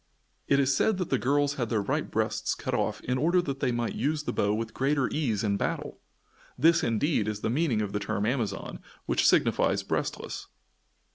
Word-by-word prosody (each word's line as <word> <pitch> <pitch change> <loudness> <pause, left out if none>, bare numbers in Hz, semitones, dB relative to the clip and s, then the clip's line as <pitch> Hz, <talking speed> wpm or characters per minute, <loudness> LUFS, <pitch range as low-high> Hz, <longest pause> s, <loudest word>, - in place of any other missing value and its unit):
It 140 - +4
is 135 -1 +3
said 215 +7 +2
that 180 -3 -3
the 135 - +2
girls 145 +2 +2
had 120 - -1
their 110 - +1
right - - -1
breasts - - -1
cut - - -4
off - - -1
in 125 +1 -1
order 170 +6 +3
that 140 -4 -4
they 135 -3 +1
might 120 -1 -1
use 150 +1 -1
the - - -3
bow 100 - +1
with 110 +1 -2
greater 135 -1 +1
ease 115 -10 0
in 100 -2 +1
battle! - - -3 0.6
This, 170 +2 +5
indeed, 115 -1 +1
is 105 -1 -3
the 110 - -1
meaning 130 -6 +1
of 100 - -5
the 105 - 0
term 100 0 -2
Amazon, 115 -5 -2 0.3
which - - +2
signifies - - +3
"breastless." - - -3
130 Hz, 200 wpm, -28 LUFS, 110-145 Hz, 0.6 s, This